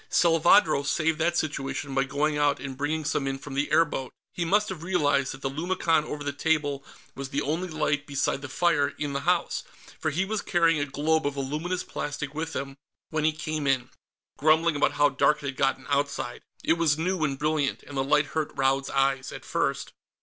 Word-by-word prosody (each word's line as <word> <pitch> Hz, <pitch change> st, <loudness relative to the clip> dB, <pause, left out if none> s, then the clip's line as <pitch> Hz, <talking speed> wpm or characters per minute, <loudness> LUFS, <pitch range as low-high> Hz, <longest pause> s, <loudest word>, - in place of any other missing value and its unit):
Salvadro 165 Hz, -2 st, +5 dB
saved 155 Hz, +3 st, 0 dB
that 175 Hz, +2 st, +1 dB
situation 140 Hz, -2 st, -2 dB
by 135 Hz, 0 st, +2 dB
going 145 Hz, +3 st, 0 dB
out 145 Hz, -1 st, +2 dB
and 135 Hz, -1 st, -6 dB
bringing 150 Hz, +3 st, -2 dB
some 135 Hz, -1 st, 0 dB
in 135 Hz, 0 st, -2 dB
from 140 Hz, 0 st, -9 dB
the 140 Hz, +2 st, -1 dB
airboat. 150 Hz, -5 st, +2 dB, 0.2 s
He 175 Hz, -, -2 dB
must 205 Hz, +5 st, +2 dB
have 185 Hz, -5 st, -6 dB
realized 145 Hz, -6 st, +1 dB
that 135 Hz, -, -10 dB
the 135 Hz, -, 0 dB
lumicon 165 Hz, 0 st, +1 dB
over 150 Hz, -1 st, -5 dB
the 145 Hz, 0 st, -2 dB
table 145 Hz, -2 st, 0 dB, 0.3 s
was 135 Hz, -1 st, -6 dB
the 140 Hz, +2 st, -1 dB
only 165 Hz, +6 st, -1 dB
light 150 Hz, -2 st, -1 dB
beside 140 Hz, -1 st, -1 dB
the 145 Hz, -, -7 dB
fire 145 Hz, -1 st, +1 dB
in 145 Hz, -2 st, -3 dB
the 140 Hz, -, -1 dB
house, 180 Hz, -1 st, +1 dB, 0.4 s
for 155 Hz, -, 0 dB
he 170 Hz, +6 st, 0 dB
was 215 Hz, +1 st, -2 dB
carrying 165 Hz, -2 st, +2 dB
a 145 Hz, -, -1 dB
globe 155 Hz, +2 st, +1 dB
of 145 Hz, -, -3 dB
the -, -, -4 dB
luminous 155 Hz, +7 st, -2 dB
plastic 145 Hz, -1 st, -5 dB
with 160 Hz, +2 st, -4 dB
him 135 Hz, 0 st, -4 dB, 0.3 s
when 155 Hz, -1 st, 0 dB
he 155 Hz, -, +4 dB
came 155 Hz, -1 st, -3 dB
in, 130 Hz, -1 st, +1 dB, 0.5 s
grumbling 160 Hz, +2 st, +4 dB
about 145 Hz, 0 st, +2 dB
how 145 Hz, 0 st, +4 dB
dark 150 Hz, +2 st, +2 dB
it 140 Hz, -, -2 dB
had 135 Hz, -, -6 dB
gotten 135 Hz, -1 st, +1 dB
outside. 140 Hz, -3 st, -1 dB, 0.2 s
It 165 Hz, -, +2 dB
was 155 Hz, -3 st, +3 dB
new 175 Hz, +1 st, -1 dB
and 140 Hz, -3 st, 0 dB
brilliant, 150 Hz, -1 st, 0 dB
and 145 Hz, -, -10 dB
the 135 Hz, -, +1 dB
light 145 Hz, +2 st, +3 dB
hurt 155 Hz, -2 st, 0 dB
Raud's 135 Hz, 0 st, +1 dB
eyes, 135 Hz, -1 st, +1 dB
at -, -, -9 dB
first. -, -, -1 dB
150 Hz, 210 wpm, -27 LUFS, 140-160 Hz, 0.5 s, Salvadro